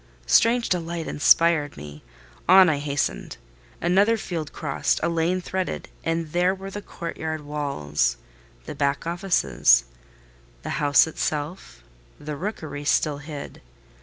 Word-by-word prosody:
Strange 230 - +4
delight 170 -2 -2
inspired 150 -1 +3
me: 75 0 -10 0.5
on 185 -1 +8
I 145 -3 0
hastened. 145 -1 -2 0.4
Another 200 +6 +3
field 165 -7 -5
crossed—a 155 +2 -1
lane 170 +2 0
threaded—and 165 -3 -4
there 180 +3 +2
were 195 0 -8
the 205 - -6
courtyard 160 -4 -5
walls—the - - -4
back 140 +2 -1
offices: 170 - +3 0.8
the - - -3
house 145 -2 +5
itself, 150 - -4 0.4
the 150 0 -6
rookery 155 -4 -5
still 145 0 +1
hid. 145 -1 -8
155 Hz, 110 wpm, -24 LUFS, 140-175 Hz, 0.8 s, on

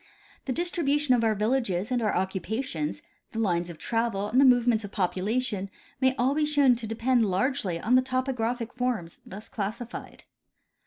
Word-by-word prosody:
The 265 - -2
distribution 295 -3 +1
of 240 -2 +2
our 220 -1 +2
villages 210 -2 0
and 245 -1 +1
our 215 - +1
occupations, 190 - -2 0.3
the - - -6
lines 175 -5 0
of 170 - -8
travel, 225 0 -1
and 255 +5 +4
the - - +7
move 245 -2 +5
ments 225 -3 +2
of 205 - -7
population 200 +2 -1 0.3
may 260 0 +3
all 255 +3 +2
be 305 - 0
shoAvn 290 -4 +4
to 225 -1 -5
depend 230 +1 +2
largely 190 -3 0
on 225 +8 0
the 255 - +7
topographic 250 -2 -2
forms 245 -9 -2
thus 205 +3 -9
classified. 220 +3 -6
230 Hz, 170 wpm, -27 LUFS, 200-255 Hz, 0.3 s, the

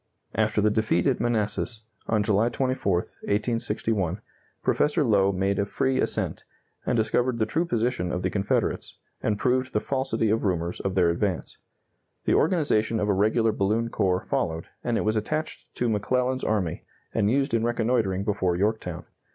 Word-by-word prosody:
After 110 -1 +1
the 105 +1 +3
defeat 110 0 +1
at 135 -4 +2
Manassas, 110 0 -1 0.2
on 110 -2 +2
July 105 +2 +2
24, 130 -8 0 0.3
1861, 105 -3 -1 0.4
Professor 150 +1 +2
Lowe 100 -5 +3
made 95 +1 0
a 100 - +2
free 130 +5 0
ascent, - - -1 0.4
and 125 - +2
discovered 115 +3 +1
the 110 - +2
true 160 +10 0
position 115 - 0
of 90 +1 -2
the 90 - 0
Confederates, 100 0 -1 0.2
and 105 -1 0
proved 130 +3 +1
the 105 - +2
falsity 130 -4 0
of 115 - +1
rumors 85 -3 -1
of 95 0 -2
their 90 -3 +4
advance. 90 +1 -2 0.7
The - - +3
organization 140 - +2
of 105 - 0
a - - +4
regular 110 +3 +2
balloon 110 +4 0
corps 95 -4 0
followed, 80 0 -1 0.2
and 120 -2 0
it - - +1
was 110 +1 +1
attached 155 +9 -3
to 120 - 0
McClellan's 125 +4 0
army, 95 -7 -1 0.3
and 100 - +2
used 135 +1 +1
in 115 -1 +2
reconnoitering 115 -5 +1
before 100 -4 0
Yorktown. 105 +4 -1
110 Hz, 165 wpm, -26 LUFS, 100-120 Hz, 0.7 s, their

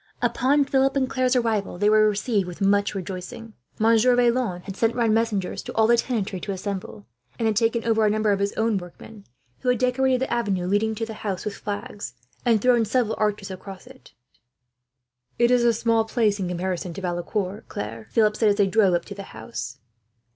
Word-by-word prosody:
Upon 280 +2 +2
Philip 270 0 +2
and 265 -2 +1
Claire's 255 -1 +1
arrival, 220 -6 0
they 205 +3 +2
were 215 0 +5
received 205 -2 0
with 180 0 -8
much 200 +1 +2
rejoicing. 190 +4 -7 0.2
Monsieur 230 +3 +4
Vaillant 235 -7 +1
had 195 - -7
sent 225 +3 +1
round 230 -3 +2
messengers 220 -4 -1
to - - -8
all 220 - +4
the 235 +2 +5
tenantry 215 -6 -2
to 200 - -5
assemble, 190 - -5 0.3
and 230 - 0
had 220 - +1
taken 230 +1 +1
over 225 -1 +2
a 210 - +4
number 215 0 +1
of 200 - +1
his 200 0 0
workmen, 210 -1 -3 0.3
who 250 - -1
had 250 - +3
decorated 255 +1 +1
the 265 - -1
avenue 200 -6 0
leading 210 +4 +1
to 225 +1 -3
the 225 - -7
house 200 -3 -4
with 210 - -2
flags, 205 - -6 0.3
and 225 -4 +2
thrown 245 -2 +4
several 225 0 0
arches 210 -2 -1
across 190 0 -9
it. - - -16 1.2
"It 240 0 +3
is 250 -1 +4
a 240 - +5
small 230 0 +1
place 220 -3 +1
in 185 - -2
comparison 180 0 -3
to - - -6
Valecourt, 185 +3 -3
Claire," 110 +1 -6
Philip 215 - +2
said, 220 -1 +3
as 205 - +3
they 205 -1 +3
drove 195 -2 +3
up 170 - -2
to 200 - -8
the 200 - -8 0.2
house. 125 - -6
215 Hz, 200 wpm, -24 LUFS, 195-235 Hz, 1.2 s, were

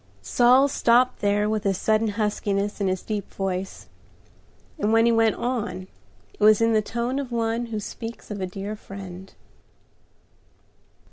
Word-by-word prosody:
Saul 250 - +5
stopped 250 -1 +3
there 205 +1 +1
with 215 -1 -1
a 195 -2 +1
sudden 220 +3 +1
huskiness 205 -1 -1
in 195 - +1
his 185 -1 -1
deep 210 -3 -4
voice, 190 -1 -4 0.9
and 215 -5 +1
when 225 0 +5
he 235 - +4
went 225 -1 +3
on 230 -6 -3 0.5
it - - -24
was 215 0 +6
in 230 0 +3
the 215 - +3
tone 235 +5 -2
of 265 -3 -5
one 230 0 -1
who 220 -2 -4
speaks 225 +2 -8
of 205 -1 -5
a 185 - -1
dear 195 +3 -5
friend. 190 -2 -10
215 Hz, 155 wpm, -24 LUFS, 200-230 Hz, 0.9 s, was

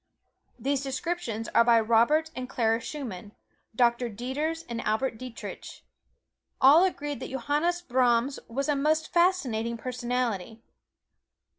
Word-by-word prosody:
These 275 0 -1
descriptions 270 -4 -3
are - - +5
by 235 -1 +5
Robert 235 +9 +3
and 255 0 -5
Clara 225 -3 +1
Schumann, 225 -7 -7 0.4
Doctor 240 0 +2
Dieters 285 +9 -3
and 235 -1 -4
Albert 220 +2 -1
Dietrich. 250 -3 -8 0.8
All 290 +7 +7
agree 295 -6 -1
that 260 - -7
Johannes 295 +7 -1
Brahms 250 -1 +2
was 275 +5 -2
a 295 - +2
most 310 +3 0
fascinating 255 -11 +1
personality. 240 -3 -3
255 Hz, 120 wpm, -27 LUFS, 230-295 Hz, 0.8 s, All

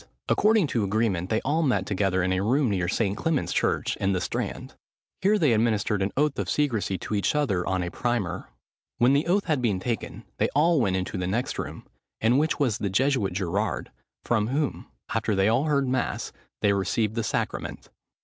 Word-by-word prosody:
According 215 -3 +4
to 120 -6 -1
agreement 100 -3 0
they 110 - +1
all 150 +4 +1
met 140 -6 +1
together 95 -2 0
in 95 +1 +1
a 95 - 0
room 125 +4 +2
near 90 -3 0
St. 100 +1 0
Clement's 160 +3 -1
church, - - 0
in 95 0 0
the 90 - 0
Strand. - - -4 0.5
Here 205 +3 +4
they 150 - +3
administered 110 -2 +1
an 95 - 0
oath 150 0 +1
of - - -2
secresy 110 -10 0
to 100 - -6
each 100 +7 +1
other 115 -12 +1
on 95 -1 0
a 85 - -4
Primer. 120 -7 -2 0.5
When 125 +3 +4
the 145 +4 +2
oath 195 +3 +2
had 155 -6 0
been 105 -6 +1
taken, 115 +4 -4 0.2
they - - +2
all 160 0 +4
went 95 -5 +1
into 95 +1 -3
the 90 - -2
next 120 +7 -2
room, - - -6 0.3
in 120 +4 +3
which 155 +1 +1
was 120 -7 +1
the 100 - -1
Jesuit 125 -1 +1
Gerard, 95 +3 -2 0.3
from 110 -3 +1
whom, 140 +3 -2 0.3
after 105 - 0
they 95 0 +3
had 115 +7 +2
heard 140 -3 +2
mass, 130 0 -1 0.3
they 100 - +3
received 100 +2 0
the 115 0 -1
sacrament. - - -3
110 Hz, 195 wpm, -26 LUFS, 95-140 Hz, 0.5 s, According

